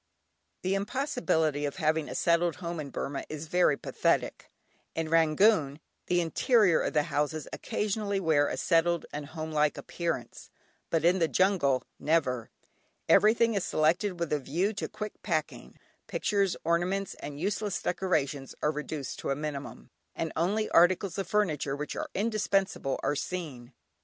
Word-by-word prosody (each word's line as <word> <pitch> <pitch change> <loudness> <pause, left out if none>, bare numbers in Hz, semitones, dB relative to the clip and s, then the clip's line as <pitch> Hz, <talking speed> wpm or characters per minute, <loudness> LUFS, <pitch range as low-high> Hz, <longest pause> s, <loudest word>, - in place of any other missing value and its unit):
The 185 +1 +1
impossibility 195 - 0
of 145 - -2
having 160 -3 0
a - - -5
settled 170 0 +2
home 170 -2 -5
in 145 -2 -5
Burmah 140 +1 -4
is 155 0 -5
very 160 -3 +3
pathetic. - - -1 0.5
In 160 -1 -2
Rangoon, 160 -1 +3 0.3
the 175 0 +2
interior 190 - +3
of - - -2
the 150 -2 +3
houses 150 +1 -2
occasionally 205 -1 -2
wear 155 -5 +3
a - - -3
settled 170 0 +2
and 145 -1 -5
homelike 155 -1 -1
appearance, 165 -9 -4 0.4
but 165 0 +1
in 180 +2 +4
the 165 - +3
jungle, 170 -9 +2 0.2
never. 130 -7 +1 0.6
Everything 230 +2 +5
is 200 -3 0
selected 175 +2 +1
with 170 -3 -1
a 150 - +2
view 175 +10 -1
to 210 - -4
quick 210 -1 -7
packing; 155 -5 -3 0.3
pictures, 200 -3 0
ornaments, 175 +4 0
and 145 0 -7
useless 205 +2 -1
decorations 145 -8 -1
are 150 - +3
reduced 150 -2 -5
to - - -4
a 135 - +1
minimum, 145 -1 -6 0.2
and 165 - -3
only 205 +6 +1
articles 185 +3 +4
of 195 - -2
furniture 160 -10 0
which 150 +1 -5
are - - -4
indispensable 195 -8 0
are 145 - +1
seen. 145 -7 -5
165 Hz, 150 wpm, -29 LUFS, 150-195 Hz, 0.6 s, Everything